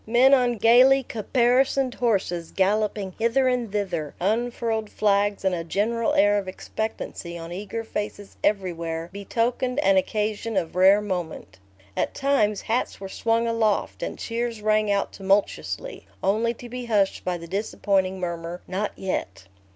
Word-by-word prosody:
Men 250 Hz, +4 st, +5 dB
on 245 Hz, -3 st, +3 dB
gayly 255 Hz, +5 st, +6 dB
caparisoned 250 Hz, +3 st, +1 dB
horses 190 Hz, -8 st, 0 dB
galloping 200 Hz, 0 st, 0 dB
hither 235 Hz, +4 st, +2 dB
and 245 Hz, -4 st, 0 dB
thither, 180 Hz, -8 st, -2 dB
unfurled 225 Hz, +1 st, -1 dB
flags, 205 Hz, -1 st, +1 dB
and 190 Hz, -, +2 dB
a 170 Hz, -2 st, -2 dB
general 220 Hz, +7 st, 0 dB
air 205 Hz, +1 st, +4 dB
of 195 Hz, -, -7 dB
expectancy 185 Hz, -3 st, -5 dB
on 165 Hz, 0 st, -8 dB
eager 210 Hz, +5 st, -5 dB
faces 205 Hz, -2 st, -5 dB
everywhere 170 Hz, -4 st, -1 dB
betokened 235 Hz, +5 st, -1 dB
an 195 Hz, -5 st, +4 dB
occasion 210 Hz, +2 st, -1 dB
of 170 Hz, -2 st, -2 dB
rare 190 Hz, +3 st, +6 dB
moment. 175 Hz, -, -5 dB, 0.4 s
At -, -, -1 dB
times 220 Hz, -8 st, +1 dB
hats 235 Hz, +3 st, -2 dB
were 195 Hz, 0 st, -7 dB
swung 230 Hz, +3 st, 0 dB
aloft 225 Hz, -3 st, 0 dB
and -, -, -4 dB
cheers 235 Hz, -1 st, -3 dB
rang 215 Hz, 0 st, +2 dB
out 200 Hz, 0 st, 0 dB
tumultuously, 200 Hz, -, -1 dB, 0.2 s
only 225 Hz, +5 st, +1 dB
to 245 Hz, -, -10 dB
be 250 Hz, +1 st, -6 dB
hushed 205 Hz, -4 st, +1 dB
by 180 Hz, -1 st, -1 dB
the 170 Hz, 0 st, -10 dB
disappointing 190 Hz, 0 st, 0 dB
murmur, 170 Hz, 0 st, -4 dB
"Not 195 Hz, +3 st, -2 dB
yet." 100 Hz, -, -4 dB
210 Hz, 145 wpm, -24 LUFS, 190-230 Hz, 0.4 s, gayly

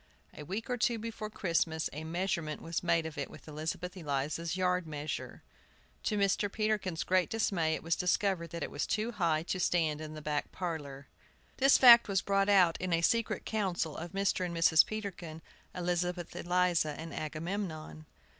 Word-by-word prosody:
A -, -, -8 dB
week 195 Hz, +9 st, -5 dB
or 250 Hz, -, -1 dB
two 235 Hz, 0 st, +1 dB
before 220 Hz, -1 st, -5 dB
Christmas 165 Hz, -5 st, 0 dB
a 150 Hz, +2 st, -6 dB
measurement 165 Hz, -2 st, -2 dB
was 165 Hz, 0 st, -3 dB
made 170 Hz, -2 st, +1 dB
of 160 Hz, -2 st, -6 dB
it 140 Hz, -, -3 dB
with -, -, -14 dB
Elizabeth 160 Hz, +4 st, -4 dB
Eliza's 155 Hz, +1 st, -2 dB
yard 180 Hz, -2 st, +1 dB
measure. 150 Hz, 0 st, -5 dB, 0.6 s
To 210 Hz, -, 0 dB
Mr. 200 Hz, 0 st, +1 dB
Peterkin's 210 Hz, -6 st, -1 dB
great 185 Hz, -1 st, +2 dB
dismay 170 Hz, -8 st, +1 dB
it -, -, -7 dB
was 165 Hz, 0 st, +1 dB
discovered 180 Hz, -1 st, 0 dB
that 170 Hz, -1 st, -5 dB
it -, -, -5 dB
was 145 Hz, -, -2 dB
too 220 Hz, +2 st, -1 dB
high 165 Hz, -7 st, +1 dB
to 185 Hz, +2 st, -3 dB
stand 160 Hz, -4 st, +1 dB
in 155 Hz, 0 st, -7 dB
the -, -, -6 dB
back 150 Hz, -1 st, -2 dB
parlor. 145 Hz, -6 st, -5 dB, 0.5 s
This 270 Hz, +1 st, +6 dB
fact 235 Hz, -2 st, +9 dB
was 195 Hz, -2 st, 0 dB
brought 195 Hz, 0 st, +2 dB
out 185 Hz, -5 st, +4 dB
at 185 Hz, -1 st, -2 dB
a 165 Hz, 0 st, +2 dB
secret 230 Hz, +6 st, +1 dB
council 185 Hz, -7 st, -1 dB
of 170 Hz, +1 st, -6 dB
Mr. 195 Hz, -1 st, 0 dB
and 170 Hz, -2 st, -3 dB
Mrs. 165 Hz, -1 st, +6 dB
Peterkin, 180 Hz, -7 st, -6 dB, 0.3 s
Elizabeth 175 Hz, 0 st, -2 dB
Eliza, 175 Hz, -4 st, +1 dB
and 165 Hz, 0 st, -7 dB
Agamemnon. 155 Hz, -1 st, -5 dB
175 Hz, 175 wpm, -32 LUFS, 160-195 Hz, 0.6 s, fact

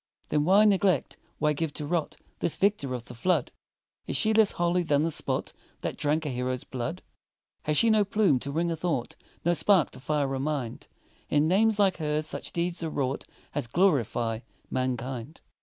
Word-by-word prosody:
Then 150 Hz, -1 st, +1 dB
why 200 Hz, +5 st, +6 dB
neglect 195 Hz, -7 st, +2 dB, 0.2 s
why 150 Hz, 0 st, +2 dB
give 150 Hz, 0 st, -2 dB
to 150 Hz, -, -4 dB
rot 165 Hz, +1 st, -2 dB, 0.2 s
This 170 Hz, -, +2 dB
victor 190 Hz, -11 st, +1 dB
of 120 Hz, -1 st, -7 dB
the -, -, -10 dB
flood? 180 Hz, +10 st, 0 dB, 0.6 s
Is -, -, -2 dB
she 220 Hz, 0 st, +3 dB
less 220 Hz, -1 st, +5 dB
holy 175 Hz, +1 st, +1 dB
than 150 Hz, -3 st, +2 dB
the 165 Hz, -, 0 dB
spot -, -, 0 dB, 0.3 s
That -, -, -3 dB
drank 155 Hz, +2 st, 0 dB
a -, -, -1 dB
hero's 125 Hz, 0 st, -2 dB
blood? 130 Hz, +8 st, -5 dB, 0.6 s
Has 150 Hz, -1 st, +1 dB
she 230 Hz, -1 st, +5 dB
no 215 Hz, -1 st, +4 dB
plume 200 Hz, -, +2 dB
to 140 Hz, -, -4 dB
wing 170 Hz, +3 st, 0 dB
a -, -, -1 dB
thought 155 Hz, -7 st, -2 dB, 0.3 s
No 175 Hz, -, +4 dB
spark 170 Hz, 0 st, +3 dB
to -, -, -11 dB
fire 145 Hz, 0 st, -1 dB
a 135 Hz, -, -2 dB
mind? 135 Hz, -5 st, -3 dB, 0.4 s
In 150 Hz, +1 st, +3 dB
names 210 Hz, +5 st, +3 dB
like 195 Hz, -3 st, +3 dB
her's 150 Hz, -1 st, -1 dB
such -, -, -4 dB
deeds 170 Hz, 0 st, -2 dB
are 160 Hz, -, -2 dB
wrought 135 Hz, -2 st, -2 dB, 0.3 s
As 145 Hz, -5 st, -1 dB
glorify 120 Hz, -, +1 dB, 0.3 s
mankind. 130 Hz, +2 st, -3 dB
155 Hz, 190 wpm, -27 LUFS, 135-180 Hz, 0.6 s, why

